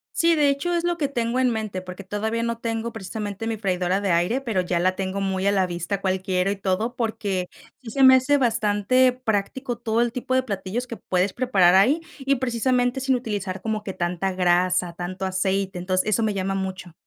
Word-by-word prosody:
Sí, 335 0 +4
de 295 -2 +3
hecho, 315 +6 -1
es 340 0 0
lo 345 -1 0
que 295 -4 0
tengo 240 -2 -1
en 255 -1 +3
mente, 215 -5 -3
porque 185 +1 -9
todavía 220 +4 -2
no 235 0 -2
tengo 230 0 -3
precisamente 210 0 -5
mi 225 -1 -2
freidora 185 -1 0
de 195 -3 0
aire, 180 +10 +1
pero 225 -8 -1
ya 175 -1 -1
la 185 +1 +2
tengo 195 +1 -3
muy 190 0 -1
a 200 - +4
la 190 -2 +2
vista 175 +3 -3
cual 190 -1 0
quiero 185 +1 0
y 205 - -3
todo, 200 +6 -1
porque 205 -6 -2 0.3
sí 235 - -9
se 270 +3 +2
me 260 0 +9
hace 275 +3 +3
bastante 235 +1 +2
práctico 245 +1 -2
todo 230 -1 0
el 240 -1 +1
tipo 255 +1 -3
de 260 - +3
platillos 210 +2 -4
que 230 - -7
puedes 185 +1 0
preparar 195 -8 +4
ahí, 260 - +4 0.2
y 270 +1 +1
precisamente 250 0 0
sin 265 0 +1
utilizar 205 -6 -4
como 215 -1 -2
que 195 - -5
tanta 180 +2 -2
grasa, 180 -1 +2
tanto 185 +2 -5
aceite, 190 0 -1
entonces, 185 +2 0
eso 220 +2 +2
me 215 -1 +1
llama 195 0 -2
mucho. 190 -3 -5
205 Hz, 215 wpm, -24 LUFS, 185-245 Hz, 0.3 s, me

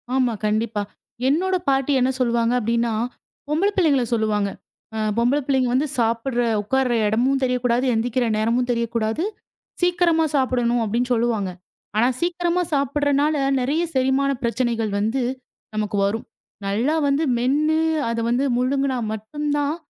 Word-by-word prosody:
ஆமா 255 -3 +2
கண்டிப்பா. 215 0 0 0.5
என்னோட 365 +7 +2
பாட்டி 270 +1 +1
என்ன 255 +1 +2
சொல்லுவாங்க 235 -1 +2
அப்டின்னா, 235 +1 0 0.6
பொம்பள 330 +7 +2
பிள்ளைங்கள 295 -8 +3
சொல்லுவாங்க. 215 -3 +1 0.5
அ - - -3 0.2
"பொம்பள 245 +5 +2
பிள்ளைங்க 265 -3 +1
வந்து 275 +4 +2
சாப்புடுற 235 +2 0 0.2
உக்காருற 255 +4 0
இடமும் 255 +6 +1
தெரியக் 250 -1 0
கூடாது, 245 +2 +2
எழுந்திக்கிற 240 +2 0
நேரமும் 235 +3 +1
தெரியக் 235 -1 -2
கூடாது. 225 +7 0 0.6
சீக்கிரமா 345 -2 +3
சாப்படணும்." 245 -3 +1
அப்டின்னு 240 +4 -1
சொல்லுவாங்க. 225 -4 0 0.5
ஆனா 235 +3 +4
சீக்கிரமா 350 0 0
சாப்புறனால 285 +2 +1 0.3
நெறைய 290 +7 0
செரிமான 265 +1 +2
பிரச்சனைகள் 235 -2 0
வந்து 225 +6 0 0.5
நமக்கு 210 -1 -1
வரும். 215 +3 -2 0.4
நல்லா 235 +10 +1
வந்து 280 +3 +1
மென்னு 295 +6 +2 0.3
அதை 230 0 -1
வந்து 245 +3 +1
முழுங்குனா 265 +1 0 0.2
மட்டும்தான், 290 +6 -2
250 Hz, 130 wpm, -22 LUFS, 230-280 Hz, 0.6 s, ஆனா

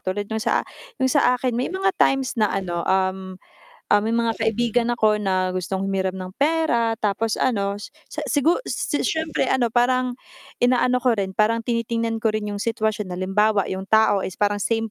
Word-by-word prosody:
tulad 195 +2 -3
nung 220 - -1
sa - - +1 0.4
nung 260 -1 +2
sa 250 0 +4
akin 250 0 -1
may 250 - -1
mga 385 0 +1
times 270 -1 +2
na 210 - +4
ano, 175 -3 -2
um, 190 0 0 0.5
um, 205 - +5
may 225 +1 0
mga 230 -1 +1
kaibigan 235 +1 0
ako 215 -2 +2
na 185 -2 0
gustong 190 +1 -2
humiram 190 -1 -1
ng 185 -1 -6
pera, 285 -7 +2
tapos 215 +2 0
ano 200 -5 0
s-sigur 300 - -1 0.4
syempre 320 0 -1
ano 245 -3 +1
parang, 250 +1 +2 0.5
inaano 250 0 +3
ko 245 -1 +3
rin 195 -2 -2
parang 225 +3 +1
tinitingnan 230 -1 -1
ko 225 - +3
rin 210 -1 -2
yung 205 - -5
sitwasyon, 215 -3 -1
halimbawa 200 +2 +2
yung 190 +1 -4
tao 220 -2 +4
is, 185 - -5
parang 205 0 0
same 225 +1 -1
220 Hz, 175 wpm, -22 LUFS, 195-245 Hz, 0.5 s, um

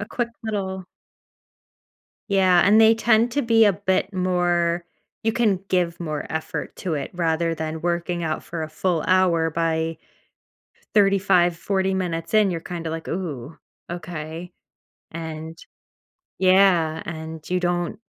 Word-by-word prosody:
A - - -3
quick 235 +2 -3
little 190 -4 -3 1.4
Yeah, 190 -3 +4
and 210 +3 +6
they 225 0 +7
tend 225 +1 +3
to 285 - +1
be 230 -1 +5
a 205 - +5
bit 190 +1 -1
more 175 -2 +1 0.4
you 225 - +1
can 215 -5 +2
give 175 -2 0
more 155 -3 -3
effort 160 0 -4
to 180 -4 -3
it 140 -2 -4
rather 165 -1 0
than 160 0 -5
working 175 0 -1
out 155 -1 -2
for 170 -2 -5
a 155 - -4
full 170 +1 0
hour, 175 -3 +3
by 160 0 -1 1.0
35, 195 -4 +3
40 190 +1 0
minutes 165 -3 -3
in, 215 -2 +5
you're 170 -2 -3
kinda 170 -2 -5
like, 160 0 -5
"Ooh, 160 -5 -5 0.3
okay." 170 0 -6 0.6
And 160 0 -7 0.8
Yeah, 185 -4 +4
and 160 -1 -7
you 180 - +2
don't 175 0 -1
175 Hz, 140 wpm, -23 LUFS, 165-190 Hz, 1.4 s, they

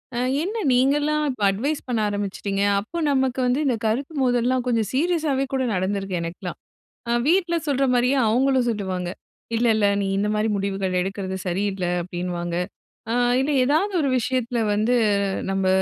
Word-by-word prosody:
"அ - - 0 0.2
என்ன 430 +5 -3
நீங்கல்லாம் 295 +4 +2
இப்ப 255 - -10
அட்வைஸ் 280 +10 -2
பண்ண 235 -3 0
ஆரம்பிச்சுட்டீங்க?" 200 -1 -2 0.2
அப்ப 335 +12 -5
நமக்கு 265 -1 +1
வந்து 250 +3 +1
இந்த 250 - +2
கருத்து 270 +8 -2
மோதல்லாம் 245 0 +1
கொஞ்சம் 230 -4 +1
சீரியஸாவே 300 -2 +1
கூட 265 -1 +1
நடந்திருக்கு 190 0 -1
எனக்கெல்லாம். 170 +1 -6 0.5
அ - - +2
வீட்ல 345 0 +2
சொல்ற 275 -1 +1
மாரியே 250 +3 +2
அவங்களும் 260 +2 +2
சொல்லுவாங்க. 190 -5 -2 0.5
"இல்லல்ல 225 -3 +3 0.2
நீ - - -1
இந்த 210 +1 0
மாரி 215 +1 +1
முடிவுகள் 195 -2 -1
எடுக்குறது 190 0 -3
சரியில்ல." 190 0 -1 0.2
அப்டின்னுவாங்க. 175 -1 -4 0.6
அ - - +1 0.3
இல்ல 280 +3 0
எதாவது 320 +9 +1
ஒரு 280 - +1
விஷயத்தில 245 -1 -1
வந்து, 220 +4 +2 0.6
நம்ப 195 0 0
235 Hz, 150 wpm, -23 LUFS, 195-270 Hz, 0.6 s, இல்லல்ல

